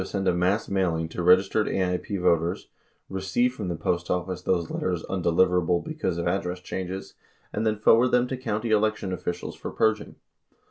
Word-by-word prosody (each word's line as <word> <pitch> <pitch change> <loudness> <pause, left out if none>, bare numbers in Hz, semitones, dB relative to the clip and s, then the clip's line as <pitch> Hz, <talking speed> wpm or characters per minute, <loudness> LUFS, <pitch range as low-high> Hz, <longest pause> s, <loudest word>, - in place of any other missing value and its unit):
204 - - -9
send 95 -1 -1
a - - +4
mass 95 +5 +1
mailing 85 -4 0
to 80 - -5
registered 95 +4 +4
AIP 95 +1 -1
voters, 85 0 +1 0.4
receive 95 +6 0
from 125 - -5
the 85 - -2
Post 85 +1 -2
Office 90 0 -2
those 85 -3 0
letters 90 -3 -2
undeliverable 90 -1 +1
because 155 - -2
of 85 - -2
address 90 0 -1
changes, 95 +1 -5 0.4
and 110 - 0
then 110 -1 +1
forward 115 +3 +5
them 125 0 +2
to 130 - -3
county 115 -3 -3
election 110 -3 +1
officials 90 -1 -4
for - - -6
purging. 110 -1 0
95 Hz, 175 wpm, -26 LUFS, 90-110 Hz, 0.4 s, forward